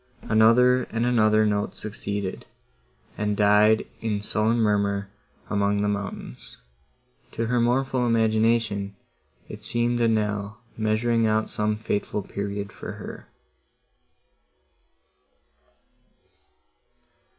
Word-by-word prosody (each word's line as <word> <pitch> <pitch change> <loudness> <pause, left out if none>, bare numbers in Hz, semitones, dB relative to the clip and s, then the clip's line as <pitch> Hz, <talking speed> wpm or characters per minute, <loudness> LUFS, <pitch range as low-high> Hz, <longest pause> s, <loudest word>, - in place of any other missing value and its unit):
Another 125 +3 +4
and 115 +1 -2
another 110 -3 +3
note 105 -1 -1
succeeded, 100 -2 -5 0.7
and 105 0 -1
died 105 +1 +4
in 105 -2 -2
sullen 110 +2 +1
murmur 100 -2 0 0.4
among 100 0 +1
the - - +1
mountains:—to 70 - -7
her 120 +1 +1
mournful 125 +1 +1
imagination 110 -3 +1 0.5
it 105 0 -10
seemed 120 +2 0
a 115 - +4
knell 105 -1 -1 0.2
measuring 110 +1 +1
out 110 0 0
some 105 0 0
fateful 105 -1 -3
period 100 +1 -5
for - - -8
her. - - -9
110 Hz, 95 wpm, -25 LUFS, 100-115 Hz, 0.7 s, Another